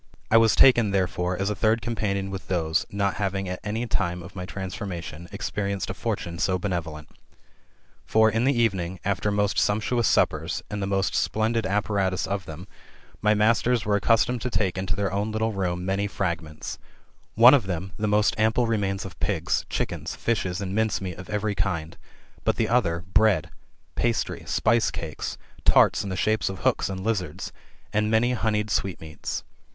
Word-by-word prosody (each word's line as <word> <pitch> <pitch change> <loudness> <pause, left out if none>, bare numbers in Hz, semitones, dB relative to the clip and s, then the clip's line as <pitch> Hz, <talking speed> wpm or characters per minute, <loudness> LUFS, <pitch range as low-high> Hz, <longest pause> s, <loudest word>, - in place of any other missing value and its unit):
I 115 - +7
was 115 -1 +5
taken, 120 -6 +6
thcfrefore, 90 -2 0
as 100 +2 0
a - - -2
third 110 +2 +2
companion 100 -4 -2
with 95 -4 -6
those: 80 -3 0
not 100 -2 -1
having 95 -1 -1
at 90 0 -4
any 110 +3 -2
time 95 -5 -1
[of 90 +4 -12
my 90 -1 -5
transformation], 90 -4 -6
experienced 100 -3 -3
a - - -3
fortune 85 0 -4
so 95 +1 +1
benevolent. 85 -5 -4 1.0
For, 110 0 +4
in 110 +2 +1
the 130 -2 +2
evening, 95 -6 0
after 100 +1 0
most 105 0 +1
sumptuous 110 +2 +1
suppers, - - +1
and 105 -1 -3
the 95 - -1
most 95 0 0
splendid 110 0 0
apparatus 100 -2 0
of 100 -2 -3
them, 80 +5 -8 0.5
my 105 0 +3
masters 115 +2 +2
were 105 0 +2
accustomed 115 +3 +2
to 125 - -2
take 100 -6 0
into 95 0 -2
their 100 -1 -1
own 105 +2 -1
little 110 +1 0
room 90 -2 -2
many 100 +2 0
frag 85 -4 -2
ments; 75 -1 -8 0.6
one 120 +4 +9
of 130 -9 +3
them, 90 +1 -3
the 105 - -1
most 105 0 +3
ample 110 +3 +3
remains 100 -3 -1
of 95 - -10
pigs, - - 0
chicken, - - -3
fishes, 95 -5 -1
and 95 -1 -3
mince 110 0 +1
meat 90 -3 -6
of 90 - -9
every 105 0 -1
kind; 85 -5 -2 0.5
but - - +2
the - - +1
other 85 0 +1
bread, 110 -2 +3 0.4
pastry, 115 -2 -1
spice 115 0 +2
cakes, 80 -2 -5 0.3
tarts - - +5
in 100 - -5
the 95 - -3
shape 110 +1 +1
of 95 -1 -7
hooks - - +1
and 95 -1 -5
lizards, 95 -8 -2 0.4
and 105 0 +1
many 115 +3 +3
honied 105 -2 0
sweetmeats. 80 -5 -3
100 Hz, 180 wpm, -25 LUFS, 90-110 Hz, 1.0 s, one